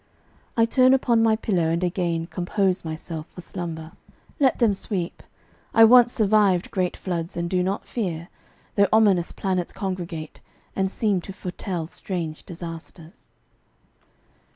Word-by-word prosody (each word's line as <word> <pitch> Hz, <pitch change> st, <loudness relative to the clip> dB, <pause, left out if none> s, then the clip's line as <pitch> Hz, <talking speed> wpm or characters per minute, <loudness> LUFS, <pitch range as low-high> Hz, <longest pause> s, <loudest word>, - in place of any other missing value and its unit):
I 230 Hz, -, +5 dB
turn 255 Hz, +2 st, +5 dB
upon 235 Hz, -3 st, +2 dB
my 225 Hz, -1 st, +4 dB
pillow 185 Hz, -7 st, 0 dB
and 170 Hz, +2 st, 0 dB
again 170 Hz, -2 st, -1 dB
Compose 185 Hz, +2 st, 0 dB
myself 160 Hz, 0 st, -6 dB
for 180 Hz, -, -7 dB
slumber. 165 Hz, -3 st, -6 dB, 0.5 s
Let 270 Hz, -3 st, +3 dB
them 230 Hz, -4 st, +3 dB
sweep; 190 Hz, -3 st, -3 dB, 0.5 s
I 225 Hz, -, +8 dB
once 240 Hz, +1 st, +7 dB
survived 205 Hz, -5 st, +3 dB
great 185 Hz, -2 st, -1 dB
floods, 170 Hz, -2 st, -4 dB
and 170 Hz, 0 st, -1 dB
do 180 Hz, +1 st, +1 dB
not 190 Hz, +3 st, -2 dB
fear, 175 Hz, -6 st, -4 dB, 0.4 s
Though 200 Hz, -1 st, +4 dB
ominous 200 Hz, -6 st, +4 dB
planets 185 Hz, -3 st, -2 dB
congregate, 175 Hz, -5 st, -5 dB, 0.3 s
and 190 Hz, 0 st, +1 dB
seem 200 Hz, -2 st, 0 dB
To 195 Hz, -, -8 dB
foretell 180 Hz, -2 st, -4 dB
strange 165 Hz, -2 st, -5 dB
disasters. 165 Hz, -1 st, -9 dB
185 Hz, 135 wpm, -24 LUFS, 170-210 Hz, 0.5 s, I